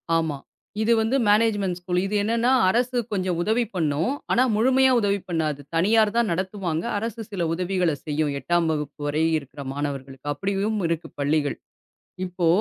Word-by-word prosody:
ஆமா. 160 -3 0 0.4
இது 225 +2 +2
வந்து 225 +4 +1
மேனேஜ்மெண்ட்டு 205 -4 +2
ஸ்கூல். 180 0 0
இது 210 - -2
என்னன்னா 230 +3 +2 0.2
அரசு 245 +3 +1
கொஞ்சம் 185 -3 -1
உதவி 220 +6 +2
பண்ணும். 160 - 0 0.2
ஆனா 250 - +4
முழுமையா 260 +3 +4
உதவி 200 -1 +1
பண்ணாது. 155 -4 -1 0.2
தனியார் 210 +5 +4
தான் 235 -4 +2
நடத்துவாங்க. 185 -2 -2
அரசு 225 +1 -4
சில 175 -4 -1
உதவிகளைச் 175 -4 -1
செய்யும் 150 -1 0
8ஆம் 175 +1 +1
வகுப்பு 150 -1 -4
வரை 150 +2 0
இருக்குற 140 0 -9
மாணவர்களுக்கு 140 -1 -5
அப்டியும் 200 +6 -1
இருக்கு 165 0 -3
பள்ளிகள். 145 0 +1 0.7
இப்போ 180 -2 -1
180 Hz, 150 wpm, -24 LUFS, 155-215 Hz, 0.7 s, ஆனா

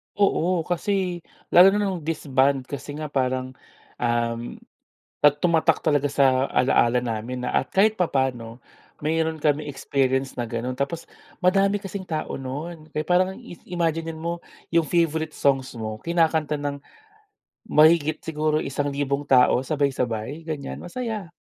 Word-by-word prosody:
Oo, 185 -4 +2
kasi 180 0 -1 0.3
lalo 190 +3 +8
na - - +1
nung 190 -3 -1
disband 140 -4 +1
kasi 145 +2 -7
nga 150 -1 -6
parang, 130 -1 -1 0.5
um 120 0 -1 0.7
at 145 0 +4
tumatak 165 -2 +3
talaga 145 -3 +2
sa 135 -2 +3
alaala 125 -1 +3
namin 120 +1 -4
na - - -1
at - - -2
kahit 215 +3 +4
papaano 130 -8 -1 0.4
meron 160 +1 -1
kaming 150 0 +1
experience 135 -1 -1
na 120 - -1
ganun 120 +2 -4
tapos 160 +5 -3 0.3
madami 195 +2 +3
kasing 195 -1 -6
tao 155 -3 -3
nun 155 +5 -6
kaya 150 - 0
parang 180 +3 +2
is 205 -8 -10
imaginen 165 -2 -1
mo 170 +2 -3 0.3
yung 165 -1 +3
favourite 160 -2 0
songs 135 -2 +1
mo 110 -1 -5
kinakanta 160 -2 +1
ng 145 -1 -3 0.9
mahigit 155 0 +5
siguro 155 -1 0
isang 140 +1 -2
libong 140 0 -1
tao 130 -1 +4
sabay-sabay, 140 -1 -2
ganyan 150 -4 -5
masaya. 215 -3 -5
150 Hz, 135 wpm, -24 LUFS, 130-170 Hz, 0.9 s, lalo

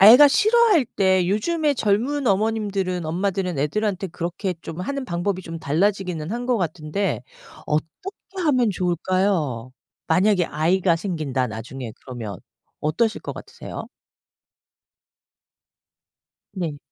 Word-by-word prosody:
애가 245 +9 +10
싫어할 430 - +4
때 190 -5 +2
요즘에 300 - +1
젊은 250 +6 +1
어머님들은 200 -4 0
엄마들은 185 0 -1
애들한테 195 +6 0
그렇게 180 +2 -3
좀 165 +2 -6
하는 275 +8 -3
방법이 185 -1 -2
좀 165 -1 -6
달라지기는 175 +1 0
한 240 +1 -3
것 250 - +2
같은데 170 +2 -2 0.4
어떻게 365 - -4
하면 255 -7 +3
좋을까요? 175 - 0 0.4
'만약에 185 +2 +4
아이가 170 +4 +2
생긴다, 155 -8 -1
나중에.' 120 +2 -6
그러면 115 -7 -6 0.4
어떠실 215 +10 +1
것 - - -4
같으세요? - - -8 2.7
네. 170 -7 -3
185 Hz, 275 characters per minute, -23 LUFS, 160-215 Hz, 2.7 s, 애가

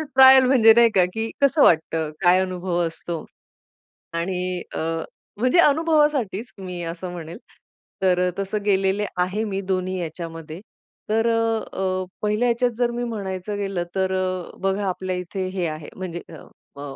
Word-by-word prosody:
Trial 265 0 +8
म्हणजे 235 -4 +6
नाही 235 0 +6
का, 185 -2 +5
की 225 0 -2
कसं 280 +2 +4
वाटतं, 160 -1 +2
काय 180 +1 +5
अनुभव 180 -1 -2
असतो? 165 0 -6 0.9
आणि 180 +1 -2
अ, - - -3 0.6
म्हणजे 255 +9 +3
अनुभवासाठीच 295 - +2
मी 180 -2 -6
असं 170 +2 -5
म्हणेल, 170 0 -8 0.6
तर 180 -1 +3
तसं 200 +1 -2
गेलेले 195 0 +2
आहे, 185 +5 0
मी 195 -2 -3
दोन्ही 185 0 -1
याच्यामध्ये. 165 0 -7 0.5
तर 225 +2 +2
अ, 230 -1 +1 0.2
अ, 185 -1 -1 0.2
पहिल्या 210 +3 +1
ह्याच्यात 240 +1 +1
जर 240 -1 +1
मी 240 +1 -3
म्हणायचं 205 -3 -4
गेलं, 195 -3 -2
तर 190 -1 +1
अ, 185 -1 -3
बघा 195 +1 0
आपल्या 185 0 -3
इथे 185 +1 -4
हे 180 -3 -1
आहे, 155 -1 -6
म्हणजे 175 -2 -5 0.6
म 140 - -8
190 Hz, 150 wpm, -23 LUFS, 180-225 Hz, 0.9 s, Trial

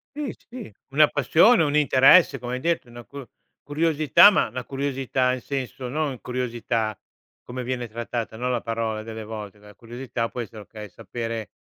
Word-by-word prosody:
Sì, 295 -3 -4 0.2
sì, 240 - -9 0.2
una 150 +2 +5
passione, 160 - +4
un 145 0 0
interesse, 135 +1 +5
come 125 0 -4
hai - - -4
detto, 165 -3 -1
una 120 0 -11
cur 140 -1 -10 0.3
curiosità, 155 +4 +5
ma - - +2
una 125 - -6
curiosità, 135 -2 -1
in 130 - -5
senso, 130 -1 -5
no 150 +2 -1
in 130 - -8
curiosità 115 -3 -2 0.5
come 125 0 -6
viene 125 -1 -3
trattata, 115 0 -5
no, 125 +2 -3
la 120 -2 -1
parola 115 -2 -3
delle 110 0 -7
volte, 105 -1 -8
la 105 0 -16
curiosità 120 0 -5
può 125 - -8
essere, 110 -1 -9
okay, 105 0 -10
sapere 115 -4 -6
125 Hz, 175 wpm, -24 LUFS, 115-140 Hz, 0.5 s, una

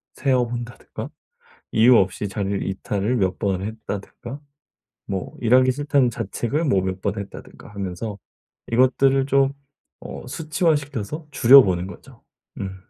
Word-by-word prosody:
세어 130 -3 +2
본다든가 120 -1 -7 0.6
이유 115 +3 +6
없이 95 0 +1
자리를 100 0 -2
이탈을 100 +4 -1
몇 95 -4 0
번을 95 -2 -1
했다든가 110 +4 -7 0.7
뭐 95 -2 -4
'일하기 130 +2 +5
싫다.'는 140 -1 +2
자책을 120 - -2
뭐 100 -10 +2
몇 95 0 -3
번 100 +1 -2
했다든가 100 - -10
하면서 100 +2 -5 0.5
이것들을 130 +2 +3
좀 135 0 +3 0.5
어 - - -8
수치화 155 +4 +1
시켜서 145 +1 -5
줄여 135 0 +8
보는 90 -2 -1
거죠. - - -13 0.4
음. 95 -1 -4
115 Hz, 290 characters per minute, -22 LUFS, 100-135 Hz, 0.7 s, 줄여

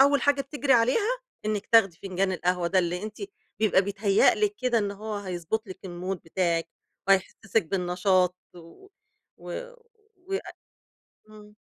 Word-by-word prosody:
أول 280 0 +4
حاجة 285 -1 +3
بتجْري 275 0 0
عليها 340 - +3 0.3
إنِك 210 -1 -2
تاخدي 195 -7 +5
فنجان 190 0 0
القهوة 180 -1 0
ده 190 - +2
اللي 180 +1 0
أنتِ 215 +1 -6 0.4
بيبقى 210 -3 +4
بيتهيأ 200 0 +3
لِك 420 -1 0
كده 250 -2 +2
إن 205 -2 -1
هو 215 +2 -6
هيضبّط 195 +3 -3
لِك 185 - -8
المود 180 0 -4
بتاعِك 170 -1 0 0.4
وهيحسّسِك 195 +3 +2
بالنشاط 180 0 +1 0.2
و 175 - -15 0.5
و - - -7 0.5
وي 390 0 -1 0.9
امم. 210 -1 -15
200 Hz, 140 wpm, -27 LUFS, 180-230 Hz, 0.9 s, تاخدي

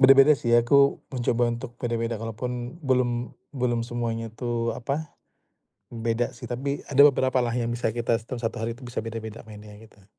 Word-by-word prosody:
beda-beda 135 +2 +8
sih 120 - -2
aku 140 +4 +4 0.2
mencoba 120 -1 +1
untuk 120 +1 -4
beda-beda 115 -1 -1
kalaupun 120 +3 -4
belum 125 -2 +1 0.3
belum 120 -2 +1
semuanya 115 -1 -3
tuh 120 -1 -2
apa, 140 +5 -4 0.8
beda 115 0 -1
sih 120 +1 -10
tapi 135 +4 -2
ada 140 0 +5
beberapa 130 -1 +1
lah 120 - -1
yang 120 0 -1
bisa 120 - 0
kita 120 0 0
tuh 125 +1 -6
1 115 -1 -3
hari 115 +1 -3
itu 130 - -14
bisa 120 -2 -4
beda-beda 110 -1 -6
mainnya 105 -1 -12
kita. 105 -3 -18
120 Hz, 170 wpm, -26 LUFS, 115-125 Hz, 0.8 s, beda-beda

